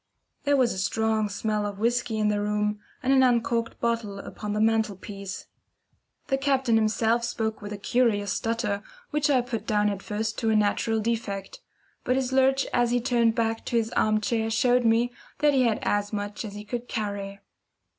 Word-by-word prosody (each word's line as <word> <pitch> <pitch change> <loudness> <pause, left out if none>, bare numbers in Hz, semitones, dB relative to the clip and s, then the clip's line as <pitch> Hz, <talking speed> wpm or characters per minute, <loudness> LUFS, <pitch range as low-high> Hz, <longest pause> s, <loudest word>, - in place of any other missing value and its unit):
There 285 0 +3
was 255 -3 +3
a 190 - -5
strong 220 +2 +1
smell 210 +1 -1
of 205 -1 -4
whisky 235 +1 0
in 215 -1 +2
the 205 0 0
room, 210 0 0 0.2
and 265 +1 +3
an 265 - +5
uncorked 235 -2 +1
bottle 230 -4 -1
upon 205 +1 -6
the 210 - -1
mantelpiece. 205 -3 -1 0.8
The 270 - 0
captain 270 -4 +2
himself 225 +2 +2
spoke 220 -2 -2
with 205 0 -7
a 210 - -4
curious 205 -3 +1
stutter, 225 -3 -1 0.3
which 300 -1 +1
I 265 -3 +4
put 230 -3 -5
down 210 -1 +2
at 200 -1 -5
first 215 +2 -3
to 225 - 0
a 220 - +3
natural 215 +1 +1
defect; 210 -4 -3 0.4
but 255 - +1
his 260 -1 -1
lurch 265 +1 +3
as 240 -1 +3
he, 245 +1 +2
turned 235 -2 +2
back 225 -1 0
to 235 - 0
his 225 -1 0
armchair 215 +1 +1
showed 245 +2 +3
me 230 +2 +3 0.2
that 295 -1 +3
he 260 -2 +4
had 225 -3 0
had 205 - +3
as 205 0 -7
much 205 0 -4
as 205 - -7
he 210 0 -8
could 240 +2 -5
carry. 200 -3 -4
225 Hz, 190 wpm, -26 LUFS, 210-240 Hz, 0.8 s, an